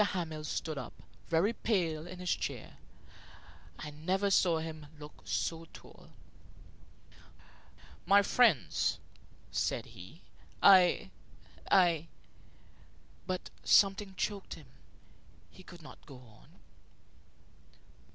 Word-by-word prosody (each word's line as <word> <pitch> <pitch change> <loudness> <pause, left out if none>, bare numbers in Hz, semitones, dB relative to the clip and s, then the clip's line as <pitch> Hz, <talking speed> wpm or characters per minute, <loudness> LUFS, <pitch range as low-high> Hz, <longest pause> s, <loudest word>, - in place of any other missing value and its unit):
Hamel 165 -6 -3
stood 155 -1 -3
up, - - -10 0.2
very 175 +7 +2
pale, 170 -9 -1
in 180 +1 -9
his 180 -1 -1
chair. - - -6 1.0
I 150 - -7
never 185 +7 -1
saw 175 -3 +4
him 160 -2 -6
look 150 0 -12
so 165 0 -2
tall. - - -15 2.0
"My 200 +2 +6
friends," 210 - +2 0.5
said - - -1
he, 90 - -13 0.4
"I 180 - +5 0.6
I 170 -4 +4 0.6
" - - -29
But 185 -1 -4
something 195 -1 +3
choked 200 -2 -3
him. 155 - -14 0.9
He - - -15
could 175 -2 -14
not - - -13
go 140 - -11
on. 120 -4 -17
170 Hz, 105 wpm, -32 LUFS, 155-190 Hz, 2.0 s, My